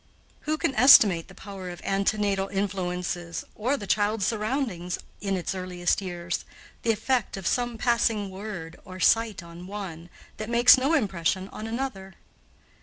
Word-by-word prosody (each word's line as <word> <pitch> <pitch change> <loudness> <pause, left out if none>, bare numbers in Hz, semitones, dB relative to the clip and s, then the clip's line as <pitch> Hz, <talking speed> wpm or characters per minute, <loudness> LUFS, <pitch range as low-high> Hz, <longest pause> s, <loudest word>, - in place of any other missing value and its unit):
Who 310 - +1
can 270 - 0
estimate 215 - +7
the 195 - -15
power 195 -2 -8
of 175 - -8
antenatal 195 0 0
influences, 180 -3 -3
or 250 +6 -1
the 205 - -7
child's 205 0 +1
surroundings 215 -5 -2 0.2
in 195 -2 -1
its 180 - -3
earliest 180 0 -1
years, 175 -2 -4 0.4
the 230 - +2
effect 225 0 -1
of 195 - -8
some 240 +1 0
passing 225 -4 +1
word 190 -4 -7
or 185 0 -10
sight 225 -3 +2
on 170 +1 -11
one, 185 -4 -7 0.3
that 215 +1 -5
makes 240 +1 +8
no 275 +5 +1
impression 190 - 0
on 215 - -7
another? 225 -6 -4
195 Hz, 150 wpm, -26 LUFS, 180-225 Hz, 0.4 s, makes